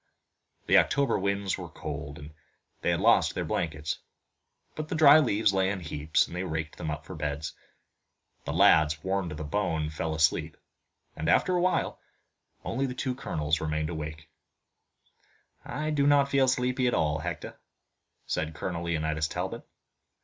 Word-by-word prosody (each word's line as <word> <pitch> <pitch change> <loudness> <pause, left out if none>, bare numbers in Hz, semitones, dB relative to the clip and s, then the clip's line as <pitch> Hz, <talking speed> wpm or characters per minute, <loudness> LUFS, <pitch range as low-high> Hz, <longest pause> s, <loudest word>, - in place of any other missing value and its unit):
The - - +6
October 140 -1 +1
winds 100 0 -1
were 90 -2 -7
cold, 70 -1 -6
and 75 +2 -11 0.5
they - - 0
had - - +1
lost - - +4
their - - -2
blankets, 80 -1 -2 0.7
but 155 0 -5
the - - -2
dry 155 -1 +8
leaves 110 -7 +2
lay 95 -1 +2
in 95 -1 -2
heaps, 75 -2 0
and - - -9
they 90 - -2
raked 80 -3 -4
them 80 - -3
up 75 +1 -5
for 95 - -8
beds. 75 -1 -3 0.9
The - - -4
lads, 75 -1 +4
worn 95 -1 -1
to 75 - -6
the 75 - -5
bone, 80 -2 -1
fell 80 0 -3
asleep, 80 0 +1 0.6
and, 80 +1 -2
after 180 - +3
a 175 - +2
while, 185 +1 0 0.7
only 135 +4 -1
the 125 - -5
two 130 -1 -2
colonels 80 - -1
remained 75 0 -1
awake. 75 -1 -6 1.4
"I 150 +4 -3
do 145 -2 +2
not 140 -1 +4
feel 135 -1 +4
sleepy 125 0 +1
at 120 - +1
all, 75 -1 +1
Hector," - - -6 0.7
said 80 0 -2
Colonel 85 -1 -4
Leonidas 80 -2 0
Talbot. - - -5
85 Hz, 165 wpm, -28 LUFS, 75-125 Hz, 1.4 s, dry